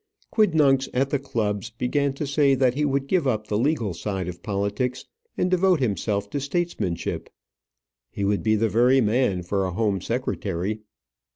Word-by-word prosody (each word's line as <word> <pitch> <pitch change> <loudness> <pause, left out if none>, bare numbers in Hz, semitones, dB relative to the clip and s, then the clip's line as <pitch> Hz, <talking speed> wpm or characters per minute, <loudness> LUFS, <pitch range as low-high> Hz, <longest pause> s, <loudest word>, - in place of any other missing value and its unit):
Quidnuncs 155 - +3
at 135 +2 +1
the 145 - +1
clubs 110 -5 -2
began 135 +5 0
to 140 +2 -4
say 140 -1 +3
that 130 -2 +3
he 150 +3 -1
would 140 -1 0
give 170 -1 +1
up 110 -4 0
the 105 -1 -1
legal 120 - 0
side 95 +1 -3
of 90 -1 -7
politics 105 +5 -2 0.3
and 180 - +1
devote 185 -2 +3
himself 100 -4 -1
to 145 - -1
statesmanship. 140 - -2 0.8
He 100 - -3
would 100 0 +1
be 110 -1 +2
the 110 +1 +2
very 125 +4 +4
man 110 -5 +1
for 95 +2 -1
a 95 - -1
home 100 -2 0
secretary. 105 -4 -2
120 Hz, 170 wpm, -24 LUFS, 100-140 Hz, 0.8 s, very